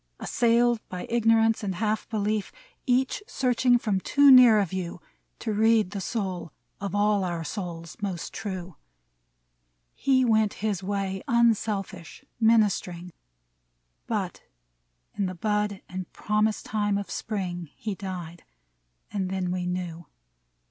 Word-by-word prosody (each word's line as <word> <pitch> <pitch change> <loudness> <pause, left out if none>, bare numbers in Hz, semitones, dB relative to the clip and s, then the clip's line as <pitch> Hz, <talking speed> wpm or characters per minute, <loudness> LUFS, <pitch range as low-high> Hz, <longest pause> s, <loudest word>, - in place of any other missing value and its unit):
Assailed 235 0 +2
by 180 -1 -5
ignorance 225 -1 +3
and 195 -3 -3
half 215 +3 -1
belief, 215 -1 -1 0.2
— - - -35
Each 255 +7 +1
searching 250 -1 +2
from 210 -5 0
too 280 +7 +5
near 250 -4 +9
a 205 - +3
view 180 -1 -5 0.4
To 220 - -3
read 220 -2 +3
the 200 -1 -4
soul 185 -6 -3 0.3
of 200 0 -4
all 205 -1 +2
our 170 -2 -2
souls 170 -2 -6
most 190 -5 -4
true, 185 -4 -6 0.6
— - - -47
He 260 -2 +2
went 220 -3 +2
his 200 -4 0
way, 195 -1 -2
unselfish, 215 -4 0 0.2
minist'ring; 200 -6 +2 1.0
But - - -3 0.7
in 200 - -1
the 185 - -5
bud 210 +1 -1
and 185 -1 -6
promise 210 0 0
time 205 -2 0
of 200 -3 -5
Spring 180 -7 -4
He 215 -2 -4
died 180 -4 -7 0.3
— - - -44
and 190 -3 -1
then 185 -1 -2
we 180 -1 -2
knew.' 175 -2 -4
200 Hz, 135 wpm, -26 LUFS, 180-220 Hz, 1.0 s, near